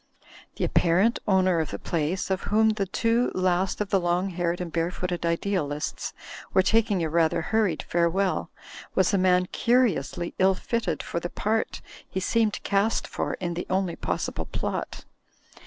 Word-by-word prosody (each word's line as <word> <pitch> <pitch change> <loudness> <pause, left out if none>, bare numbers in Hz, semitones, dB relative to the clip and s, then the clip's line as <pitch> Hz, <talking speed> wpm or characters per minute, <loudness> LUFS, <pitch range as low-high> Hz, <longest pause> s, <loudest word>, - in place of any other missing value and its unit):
The - - -3
apparent 185 +7 +3
owner 185 -3 +3
of 155 -4 -1
the 100 - -4
place, 170 - -2
of 190 - -1
whom 220 +1 +4
the 210 -3 -1
two 230 +5 +1
last 185 0 +1
of 210 - -3
the 195 - +4
long 175 +2 0
haired 175 0 -1
and 175 -2 -4
bare 165 +1 0
footed 180 -1 -3
idealists 170 -4 -2 0.4
were 190 - +6
taking 210 -3 +2
a - - +1
rather 165 0 +2
hurried 210 -5 +1
farewell, 175 +3 0 0.5
was 190 +2 +3
a 195 - +3
man 180 0 +4
curi 240 0 +3
ously 140 +5 -5
ill 190 0 +4
fitted 235 +4 -2
for 170 - -3
the 175 - -4
part 220 +4 -1 0.3
he 190 - -2
seemed 215 +2 +1
cast 200 +2 +1
for - - -3
in 175 -2 -3
the 175 - -5
only 185 -2 0
possible - - -3
plot. - - -4
185 Hz, 170 wpm, -26 LUFS, 170-200 Hz, 0.5 s, were